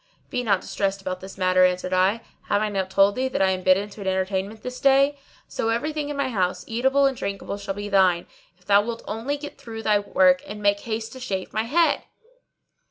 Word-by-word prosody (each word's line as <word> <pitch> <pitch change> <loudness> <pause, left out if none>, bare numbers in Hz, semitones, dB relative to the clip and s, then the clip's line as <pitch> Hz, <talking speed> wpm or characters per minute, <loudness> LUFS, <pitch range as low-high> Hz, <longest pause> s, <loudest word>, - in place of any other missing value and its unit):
"Be 250 - -1
not 200 -6 +1
distressed 195 0 -2
about 185 -1 -4
this 190 +1 -10
matter," 185 -1 +3
answered 185 0 +1
I; 190 +5 +2 0.3
"have 205 - +2
I 215 0 0
not 190 -2 -2
told 195 +1 +4
thee 260 +3 -1
that 260 - -3
I 190 - +3
am 185 0 -2
bidden 185 +2 +3
to 205 - -11
an 195 - -5
entertainment 190 +3 -2
this 250 0 -6
day? 275 +1 +4 0.3
So 225 - -2
every 240 +7 -1
thing 300 -1 -3
in 290 - -4
my 280 -2 0
house, 185 -6 -1
eatable 265 +5 +2
and 270 -1 +2
drinkable, 200 -2 -4
shall 200 -1 -4
be 205 0 -5
thine, 185 -4 +3 0.3
if 180 - -29
thou 200 +1 +5
wilt 230 +2 -5
only 235 +7 -2
get 290 0 -9
through 225 -1 -8
thy 210 -1 +3
work 185 -2 +3
and 210 +1 -7
make 205 0 +2
haste 225 +1 -4
to 260 - -9
shave 195 -7 -4
my 220 +1 0
head." 330 +7 +2
205 Hz, 230 wpm, -24 LUFS, 190-240 Hz, 0.3 s, thou